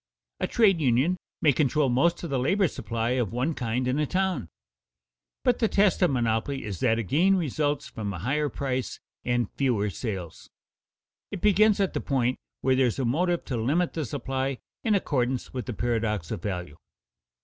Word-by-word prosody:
A - - 0
trade 195 -7 +3
union 135 +6 +3 0.3
may 150 - +6
control 150 +2 +2
most 165 +9 +2
of 170 - -4
the 135 - +1
labor 190 +9 +2
supply 115 -4 -3
of 125 -6 0
one 130 +7 0
kind 125 -1 -2
in 130 +3 +1
a 150 - +1
town. 185 - -1 0.9
But 245 -1 +2
the 225 - +3
test 200 -2 +3
of 180 - +5
monopoly 120 +1 0
is 100 -6 -5
that 115 -2 +2
a 115 - -1
gain 170 - +3
results 150 -4 -1
from 105 -4 -5
a 95 - -5
higher 140 - 0
price 130 -3 -3 0.2
and 120 -2 +1
fewer 115 -7 +1
sales. 95 -6 -6 0.8
It 200 - -5
begins 210 +2 +4
at 195 -2 +1
the - - -2
point 130 -3 0 0.2
where 130 0 +3
there 130 -1 +4
is 115 - -2
a 135 - 0
motive 170 +8 +1
to 125 - -3
limit 150 +10 +1
the 160 - -2
supply 135 +1 -2 0.3
in 220 -3 +3
accordance 130 -8 -1
with 125 -1 -4
the 125 - -3
paradox 110 -6 -1
of - - -3
value. 90 -7 -4
130 Hz, 185 wpm, -27 LUFS, 115-165 Hz, 0.9 s, may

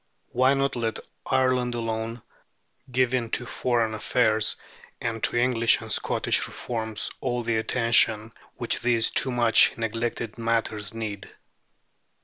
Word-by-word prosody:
Why 130 +2 +3
not 135 0 0
let 115 -2 -2 0.3
Ireland 130 -2 +1
alone, 115 0 -4 0.7
giving 125 -1 +1
to 125 - -9
foreign 120 -3 0
affairs 110 -1 +1 0.4
and 115 -1 -3
to - - 0
English 120 -2 +3
and - - -3
Scottish - - 0
reforms 110 -3 -4
all 120 -2 -2
the 115 -1 0
attention 110 -1 +2 0.2
which - - -1
these 115 -1 +2
too 135 - +2
much 120 -2 +4
neglected 115 0 -3
matters 115 -3 -1
need? 110 -3 -6
115 Hz, 125 wpm, -25 LUFS, 110-125 Hz, 0.7 s, much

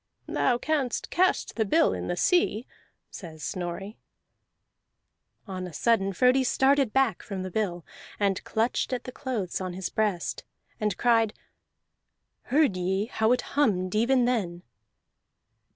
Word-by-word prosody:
"Thou 245 - +1
canst 280 -2 -1
cast 370 +1 +2
the 220 - +3
bill 320 +11 +3
in - - -4
the 175 - -2
sea," 255 - +2 0.5
says 160 -5 -9
Snorri. 185 +4 -5 1.5
On 185 -3 -5
a 175 - -10
sudden 195 +2 +2
Frodi 255 +7 +3
started 265 -1 +3
back 265 -7 +2
from 190 -2 -5
the 185 - -5
bill, 175 -5 -2 0.3
and 200 -2 +1
clutched 230 +3 -1
at 250 - -2
the 255 - -7
clothes 235 -10 -3
on 185 -1 -4
his 185 +1 -4
breast, 205 -5 -1 0.4
and 210 -4 -1
cried: 225 -3 +3 1.1
"Heard 280 -6 +3
ye 190 +3 0
how 220 -1 +1
it 250 - +3
hummed 190 -10 +1
even 240 +3 +3
then?" 185 -8 -1
215 Hz, 135 wpm, -27 LUFS, 185-250 Hz, 1.5 s, the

